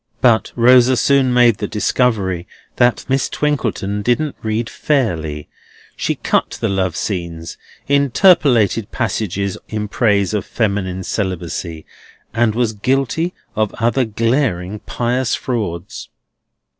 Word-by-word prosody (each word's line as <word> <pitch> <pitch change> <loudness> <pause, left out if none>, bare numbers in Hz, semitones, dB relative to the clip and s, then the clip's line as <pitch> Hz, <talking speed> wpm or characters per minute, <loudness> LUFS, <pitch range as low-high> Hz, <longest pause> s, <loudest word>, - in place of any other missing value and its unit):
But 120 -3 +3
Rosa 125 +1 +5
soon 135 0 +3
made 120 -4 +4
the 105 - -2
discovery 100 -5 0 0.3
that 120 -1 +2
Miss 135 +1 0
Twinkleton 115 -9 -1
didn't 130 +7 0
read 110 +1 -2
fairly. 80 - -1 0.5
She - - -1
cut - - -1
the - - 0
love 95 -3 -1
scenes, 85 -4 -4 0.3
interpolated 140 - +3
passages 100 -4 -2
in 105 -1 -3
praise 100 -2 +1
of 105 - -1
female 100 -4 -2
celibacy, 85 -5 -4 0.5
and 115 -2 +1
was 115 -2 0
guilty 135 - -1 0.2
of 110 -1 -1
other 120 +2 +1
glaring 110 -4 -1
pious 125 +2 -1
frauds. 100 -8 -4
110 Hz, 115 wpm, -18 LUFS, 95-125 Hz, 0.5 s, Rosa